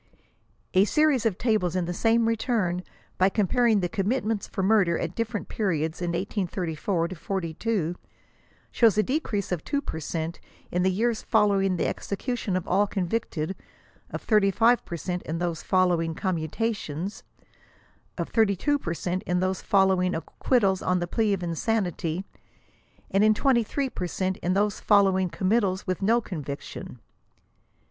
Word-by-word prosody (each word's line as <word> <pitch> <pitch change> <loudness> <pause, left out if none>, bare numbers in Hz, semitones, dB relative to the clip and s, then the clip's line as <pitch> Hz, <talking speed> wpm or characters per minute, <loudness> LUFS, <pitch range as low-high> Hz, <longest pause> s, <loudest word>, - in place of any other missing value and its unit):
*' - - -40
A - - +5
series 280 -1 +3
of 195 -5 -2
tables 215 -7 +1
in 180 -2 0
the 175 - -3
same 225 +4 +2
return, 215 -6 0 0.4
by 185 +1 +5
comparing 220 +1 +2
the 175 - 0
commitments 215 +2 -1
for 190 - -3
murder 190 -4 +3
at - - -3
different 230 -2 -3
periods 165 -6 -1
in 175 - -1
1834 175 -2 -2
42, 180 +1 -2 0.8
shows 225 -3 +4
a 215 - +4
decrease 240 - -2
of 175 -4 -2
2 285 - -1
per 160 - -5
cent 160 +2 -4 0.3
in 180 - +1
the 185 - +3
years 225 +4 0
following 200 -4 +2
the - - 0
execution 215 -1 -2
of 185 - -5
all 205 +1 +3
convicted; 190 -3 -2 0.5
of - - -6
35 215 +3 +3
per 170 - -5
cent 180 +3 -3
in 160 - -4
those 170 -2 -2
following 175 -3 +1
commutation; 180 -1 -2 1.1
of - - -3
32 225 +6 +2
per 170 -9 -3
cent 180 +2 -2
in 180 0 +1
those 185 +1 -1
following 190 -2 +3
acquittals 195 +3 +1
on 180 - +1
the 175 - -1
plea 215 +4 0
of 190 -3 -1
insanity; 175 -1 -1 0.9
and 195 +2 +3
of 215 0 +5
23 265 +2 +1
per 180 - -3
cent 185 +1 -2
in 180 - -1
those 205 +1 +1
folio 200 -2 +5
wmg 185 -2 0
committals 195 -1 +1
with 185 0 -2
no 225 +5 +4
conviction. 145 - -7
190 Hz, 155 wpm, -26 LUFS, 175-220 Hz, 1.1 s, A